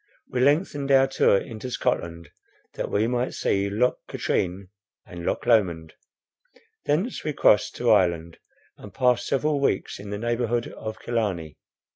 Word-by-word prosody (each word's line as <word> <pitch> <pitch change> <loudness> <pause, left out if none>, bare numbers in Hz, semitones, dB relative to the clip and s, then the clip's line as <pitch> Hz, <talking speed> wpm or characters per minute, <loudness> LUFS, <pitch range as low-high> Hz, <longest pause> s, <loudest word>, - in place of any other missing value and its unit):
We 125 - -2
lengthened 145 0 +1
our 135 0 +6
tour 135 -6 +3
into 115 +4 -6
Scotland, 85 -8 -2 0.4
that - - -4
we 105 +2 +1
might 125 +1 -1
see 100 0 0
Loch 120 +5 +1
Katrine 95 +1 -2 0.4
and 85 -1 -9
Loch - - -1
Lomond; 85 -9 +2 0.9
thence 180 - -1
we 150 - -2
crossed - - +3
to - - +2
Ireland, 85 -2 +2 0.4
and 100 -2 -12
passed 125 -2 +2
several 145 +1 +1
weeks 135 -9 -1
in 100 0 -9
the 100 - -3
neighbourhood 120 +1 -1
of 110 0 -7
Killarney. 95 -10 -3
115 Hz, 145 wpm, -25 LUFS, 95-130 Hz, 0.9 s, our